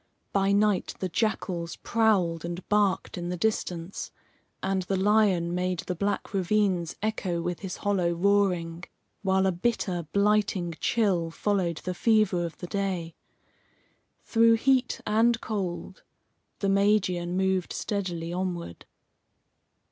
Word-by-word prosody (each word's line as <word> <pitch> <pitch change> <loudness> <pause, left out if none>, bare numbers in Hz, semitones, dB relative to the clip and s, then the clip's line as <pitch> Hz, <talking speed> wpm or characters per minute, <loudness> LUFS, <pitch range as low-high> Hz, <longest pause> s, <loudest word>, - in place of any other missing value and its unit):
By 195 0 +2
night 205 -1 +2
the 185 - -3
jackals 175 -4 -1
prowled 195 -8 +1
and 175 +1 -6
barked 205 -3 +1
in 175 0 -4
the 180 - -3
distance, 180 -3 -2 0.5
and 190 -1 0
the 190 +1 -1
lion 190 -4 +3
made 180 -1 -1
the 180 - -3
black 200 +4 -2
ravines 190 -3 +1
echo 195 -5 -1
with 175 0 -3
his 190 -3 -5
hollow 195 -4 +1
roaring, 175 -2 +1 0.4
while 190 -1 +2
a 190 - +3
bitter, 180 -3 -1
blighting 200 -4 +2
chill 190 -8 +1
followed 175 -2 -1
the 185 - -2
fever 210 -3 +2
of 170 -1 -5
the - - -7
day. 180 -3 -2 1.1
Through 230 0 +4
heat 255 +2 +1
and 225 +2 +3
cold, 190 -5 -4 0.6
the 200 - +1
Magian 195 -3 +2
moved 190 -1 +1
steadily 175 -5 -3
onward. 175 - -4
190 Hz, 125 wpm, -27 LUFS, 175-205 Hz, 1.1 s, Through